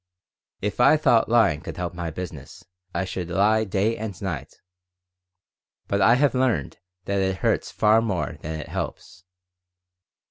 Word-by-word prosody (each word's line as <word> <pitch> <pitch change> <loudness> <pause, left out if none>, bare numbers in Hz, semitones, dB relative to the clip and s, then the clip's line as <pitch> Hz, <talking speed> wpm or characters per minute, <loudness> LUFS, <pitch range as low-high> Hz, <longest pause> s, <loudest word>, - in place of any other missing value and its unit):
If 105 +3 -3
I 150 +5 +6
thought 125 -8 +3
lying 110 -11 +3
could 90 - -8
help 90 -1 -3
my 85 -1 -4
business, 80 -3 -8 0.3
I 90 +2 -2
should 90 -2 -5
lie 105 +5 +3
day 100 +3 0
and 105 -4 -6
night. 90 -9 -5 1.3
But 100 0 0
I 115 +5 +6
have 140 +2 +3
learned 125 - 0 0.3
that 100 0 0
it 95 0 0
hurts - - 0
far 110 +2 +4
more 100 -6 -2
than 80 +1 -5
it - - -7
helps. 90 - -6
95 Hz, 150 wpm, -24 LUFS, 90-110 Hz, 1.3 s, I